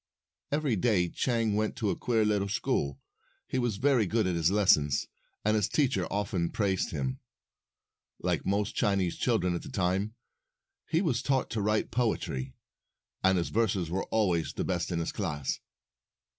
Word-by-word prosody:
Every 145 -5 +1
day 95 -4 +2
Chang 115 -1 0
went 110 +1 0
to 110 -6 0
a - - -1
queer 115 -3 +1
little 100 -2 +1
school. 70 -8 -1 0.5
He 130 - -1
was 120 -5 0
very 125 -3 +3
good 110 +2 +1
at 90 - +1
his 85 -1 +2
lessons, 90 -8 +3 0.4
and 105 +1 +3
his 105 -3 +1
teacher 125 - +1
often 95 -4 -1
praised 95 -3 0
him. 65 -4 -3 1.0
Like - - -1
most 100 +2 0
Chinese 95 -4 +1
children 100 -8 +1
at 85 - -2
that - - -10
time, 95 +4 0 0.7
he 165 +3 +2
was 125 -9 +1
taught 135 -2 0
to 110 - -1
write 105 +1 +1
poetry, 70 - -1 0.7
and 95 0 +4
his 85 - -1
verses 100 -7 0
were 95 +2 -1
always 90 -9 +1
the - - -2
best 85 -2 -1
in 85 - -1
his 85 - -1
class. 75 -9 -2
100 Hz, 165 wpm, -29 LUFS, 90-110 Hz, 1.0 s, and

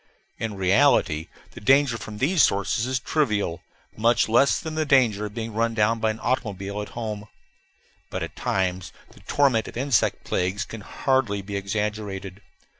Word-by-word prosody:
In 110 -2 -3
reality, 95 - +3 0.2
the - - -11
danger 135 +1 +4
from 105 0 -7
these 155 - +2
sources 100 +4 +2
is 130 0 0
trivial, 105 - 0 0.3
much 115 +2 +3
less 120 +5 +4
than 160 -2 -6
the 155 0 0
danger 120 -8 +3
of 105 - -13
being 115 -1 -4
run 115 +1 0
down 115 +1 +2
by 110 0 +1
an 110 +1 -3
automobile 100 -5 -2
at 105 - -7
home. 105 -3 -4 0.8
But - - -3
at - - -7
times 95 -2 -1 0.2
the - - -18
torment 135 -6 +2
of - - -8
insect 130 -2 +1
plagues 95 +5 -1
can 115 - -8
hardly 120 -4 0
be 100 +1 -6
exaggerated. 100 -1 -3
110 Hz, 165 wpm, -24 LUFS, 100-125 Hz, 0.8 s, danger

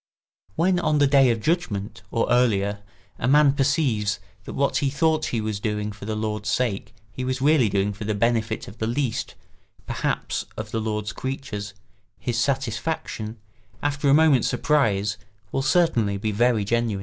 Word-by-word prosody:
When 180 +1 +2
on 155 -3 +1
the 145 - +5
day 135 -2 +5
of 115 -2 0
judgment, 120 - -1
or 115 - 0
earlier, 105 -5 +2 0.4
a 115 - 0
man 145 +1 +5
perceives 135 -8 +1 0.3
that - - -7
what 140 0 +1
he 140 - +1
thought 155 +2 +1
he 115 - -1
was 110 -2 -2
doing 105 0 -2
for 100 0 -10
the 110 0 -2
Lord's 105 -1 -2
sake 110 -3 -1 0.2
he 130 +5 -5
was 130 0 -1
really 140 -4 +4
doing 100 +1 0
for 105 - -7
the 105 0 -1
benefit 110 0 0
of 105 +3 -12
the 110 - -1
least, 125 0 -2 0.5
perhaps, - - -2
of 110 -1 -5
the 115 -2 -1
Lord's 105 -1 -2
creatures, 110 -7 -5 0.4
his 120 -1 -2
satisfaction, 120 -3 -2 0.5
after 145 0 +1
a - - +6
moment's 150 -6 +4
surprise, 105 -9 +1 0.3
will 135 - 0
certainly 125 - +2
be 110 +2 -2
very 115 0 +2
genuine. 115 -2 0
115 Hz, 170 wpm, -24 LUFS, 105-140 Hz, 0.5 s, a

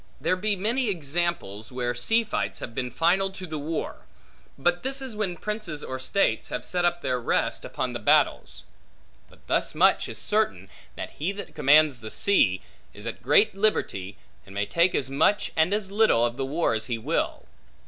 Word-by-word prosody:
There 185 - +1
be 205 +3 0
many 225 +5 0
examples, 155 - -2
where 125 -1 -2
sea 225 - +2
fights 215 - -3
have - - -7
been 125 +1 -3
final 175 +9 +2
to 190 -1 -7
the 155 -3 -5
war; 155 +2 -5 0.5
but 175 +5 +1
this 270 +1 -2
is 260 -5 -5
when 195 -5 -2
princes 210 -8 -4
or 130 0 -5
states 195 +9 +1
have - - -4
set 180 -1 0
up 175 0 0
their 125 -2 -1
rest, - - 0
upon - - -3
the - - -4
battles. - - +2 0.7
But - - -22
thus - - 0
much - - +3
is - - -7
certain, - - 0 0.3
that - - -6
he 165 +6 0
that 200 - -8
commands 150 -2 +4
the 110 -1 -8
sea, 100 - +2 0.3
is 105 - -8
at 115 - -5
great 150 - +4
liberty, 105 - -1 0.3
and 100 0 -14
may 100 0 0
take 170 - +2
as 135 -1 0
much, 200 +9 +2
and 160 +3 +3
as 205 -2 -1
little, 205 - +4
of 120 0 -2
the 135 0 -3
war 155 -1 0
as 110 0 -1
he 120 -2 -1
will. 110 - -2
165 Hz, 190 wpm, -26 LUFS, 125-200 Hz, 0.7 s, commands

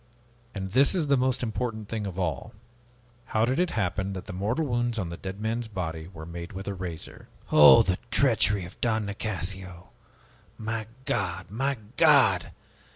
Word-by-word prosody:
And 95 -1 -4
this 135 - +4
is 170 -4 +1
the 140 - +5
most 130 -1 0
important 110 -2 -3
thing 110 -2 -3
of 95 -2 -7
all. 80 -2 -3 0.8
How 110 - +4
did 130 +6 0
it 180 -1 +2
happen 95 - -1
that 95 - -6
the - - -7
mortal 110 - -1
wounds 120 -2 -1
on 95 -6 -2
the 85 - -5
dead 95 +1 -7
man's 115 +2 -2
body 80 -5 -5
were 80 -4 -9
made 85 +4 -7
with 95 +1 -7
a 100 - -2
razor?" 90 -4 -7 0.2
"Oh, 75 +10 +9
the 90 -3 -1
treachery 110 -6 +3
of 90 - -13
Don 110 -3 +1
Nicasio! 95 -3 -5 0.7
My 110 0 -3 0.2
God! 90 -1 -2
My 135 +5 -1 0.2
God! 130 - +5
105 Hz, 170 wpm, -27 LUFS, 90-120 Hz, 0.8 s, Oh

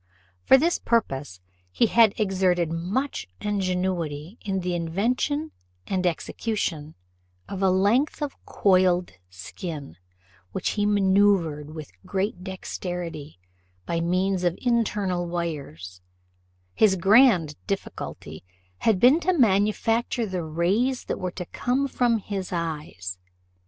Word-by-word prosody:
For 265 - +6
this 335 +6 +1
purpose 135 - -1 0.3
he 235 - +3
had 225 -1 +4
exerted 185 -5 +1
much 180 - -2
ingenuity 185 -4 -2
in 190 -2 -1
the 180 0 -2
invention 240 - -1 0.3
and 185 -2 0
execution 165 -3 -3 0.5
of 195 -1 -5
a 190 - +4
length 205 - +2
of 285 - -4
coiled 185 -2 +3 0.2
skin, 125 - -8 0.6
which - - -1
he 205 -1 0
manoeuvred 190 -7 +2
with 155 - -8
great 195 -1 -2
dexterity, 175 - -6 0.5
by 170 0 -1
means 185 +2 0
of 175 -1 +1
internal 210 -7 0
wires; 140 - -5 0.7
his 210 -3 +4
grand 190 - +5
difficulty 80 - -5 0.4
had 220 -5 +2
been 255 - +6
to 370 +2 +1
manufacture 225 +1 +2
the 185 -3 -3
rays 190 +12 0
that - - -3
were 185 - -2
to 180 0 -6
come 260 +9 -1
from 245 -3 +2
his 195 -3 -5
eyes. 150 - -4
185 Hz, 115 wpm, -25 LUFS, 165-215 Hz, 0.7 s, For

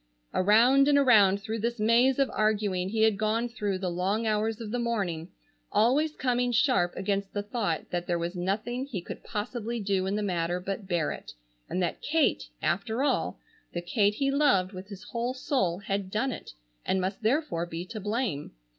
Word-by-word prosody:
Around 235 +8 +5
and 290 -1 +5
around 205 -8 +5
through 225 +2 -3
this 235 +2 -2
maze 235 +4 +4
of 275 -1 +2
arguing 205 -4 +1
he 220 +1 +1
had 220 -2 +3
gone 220 +2 +1
through 210 -5 -2
the 185 -1 -2
long 195 +6 0
hours 220 +1 0
of 220 -2 -6
the 245 - -1
morning, 195 -8 -2 0.4
always 275 +9 +3
coming 245 -1 +1
sharp 240 -7 +2
against 195 0 -2
the 205 - -1
thought 205 -6 -2
that 175 0 -2
there 175 - +1
was 170 +2 -3
nothing 215 +8 -2
he 235 -9 -4
could 170 - -8
possibly 230 +2 -3
do 195 -2 0
in 195 - 0
the 210 - -1
matter 175 -2 -1
but 195 +2 -5
bear 175 -5 0
it, - - -8 0.4
and 185 - 0
that 170 - -2
Kate, 300 - +1
after 220 - 0
all, 290 - 0 0.4
the 175 - -1
Kate 205 +2 +2
he 275 +3 +1
loved 275 -11 +3
with 185 +1 -8
his 200 -1 -10
whole 240 +1 -3
soul, 195 - 0
had 195 0 -3
done 225 +7 0
it - - -8 0.3
and 190 - +1
must 190 +3 -2
therefore 225 - 0
be 170 +1 -5
to 215 +3 -7
blame. 210 - -2
210 Hz, 190 wpm, -28 LUFS, 185-240 Hz, 0.4 s, Around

